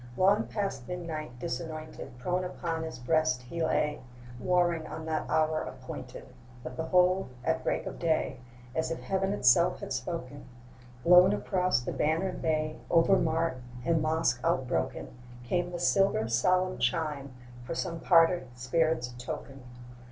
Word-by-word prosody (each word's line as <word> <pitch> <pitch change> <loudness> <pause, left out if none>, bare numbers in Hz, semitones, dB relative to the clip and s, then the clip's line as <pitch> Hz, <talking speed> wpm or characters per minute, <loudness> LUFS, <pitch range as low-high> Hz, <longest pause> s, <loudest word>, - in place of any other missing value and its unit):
Long 200 +4 +4
past 195 - -3
midnight, 160 -7 -5
disanointed, 155 +1 -6
Prone 180 +9 -1
upon 170 -2 -3
his 160 0 -5
breast 130 0 +1
he 165 +7 -4
lay, 150 -2 0 0.4
Warring 175 0 +1
on 160 - -7
that 160 -1 -2
hour 155 0 +2
appointed: - - -8 0.4
But 125 - -7
behold! 180 +3 +2
at 160 +4 0
break - - -1
of - - -6
day, 160 -6 0 0.3
As 160 - -1
if 165 - -3
heaven 195 0 0
itself 170 -1 +4
had - - -5
spoken, 145 -5 -5 0.6
Blown 180 +3 +7
across 185 - +1
the - - -4
bannered 165 +5 0
bay, 155 -1 0
Over 170 +3 +5
mart 165 -6 0 0.2
and 165 -2 +2
mosque 155 -5 +1
outbroken, 130 -6 -1 0.3
Came 175 +7 -1
the 175 - -4
silver 195 - +2
solemn 185 +11 +2
chime 150 -5 -1 0.3
For 135 - -5
some 165 0 -3
parted 165 -4 +4
spirit's 125 0 0
token! 135 +2 -6
160 Hz, 140 wpm, -29 LUFS, 140-180 Hz, 0.6 s, Blown